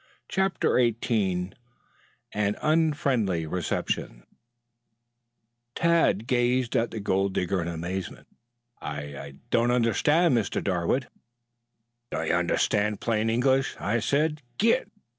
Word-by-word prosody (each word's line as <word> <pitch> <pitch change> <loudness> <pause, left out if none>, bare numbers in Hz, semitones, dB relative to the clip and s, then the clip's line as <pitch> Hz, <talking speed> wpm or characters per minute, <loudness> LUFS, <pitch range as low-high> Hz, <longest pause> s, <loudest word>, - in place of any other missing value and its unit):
CHAPTER 190 -8 +1
XVIII 105 -6 0 0.8
AN 105 0 0
UNFRIENDLY 140 - +1
RECEPTION 80 -7 -3 1.5
Tad 165 - +2
gazed 125 0 +1
at 115 0 +2
the 110 - -6
gold 95 -1 0
digger 90 +1 0
in 85 - -3
amazement. 85 +2 -5 0.6
"I 75 0 -4 0.2
I 70 0 -8 0.2
don't 115 +1 +3
understand, 125 +6 +3
Mr. 115 -3 0
Darwood." 95 +7 0 1.0
"Don't - - -2
you - - +2
understand 105 0 +1
plain 115 -1 0
English? 130 +3 +2
I 110 +4 0
said 150 +5 0 0.2
'git.' 230 +4 +2
115 Hz, 105 wpm, -26 LUFS, 95-135 Hz, 1.5 s, don't